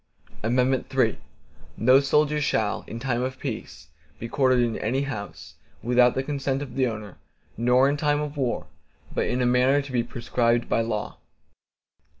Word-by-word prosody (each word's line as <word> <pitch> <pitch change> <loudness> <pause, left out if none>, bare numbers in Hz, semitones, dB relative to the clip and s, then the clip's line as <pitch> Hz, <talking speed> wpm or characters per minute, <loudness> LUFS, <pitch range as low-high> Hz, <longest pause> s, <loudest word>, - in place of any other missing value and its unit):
III 125 +3 +1 0.6
No 130 +4 +6
soldier 150 +2 +2
shall, 110 -7 0
in 115 - -6
time 120 0 -1
of 130 +1 -3
peace 75 - -7 0.3
be 115 - -6
quartered 130 0 +2
in 115 -2 -1
any 130 +6 0
house, 80 - -7 0.3
without 125 +1 +4
the 130 - 0
consent 140 -1 -2
of 130 -4 -9
the 130 -1 +1
owner, 110 -4 -7 0.4
nor 125 +3 +3
in 145 +1 0
time 145 0 +1
of 150 0 -4
war, 125 - -1 0.5
but - - 0
in 125 +1 0
a - - +2
manner 125 +3 +3
to 140 -1 -6
be 125 -2 +1
prescribed 120 0 0
by - - +1
law. 110 -2 -4
125 Hz, 160 wpm, -25 LUFS, 115-135 Hz, 0.6 s, No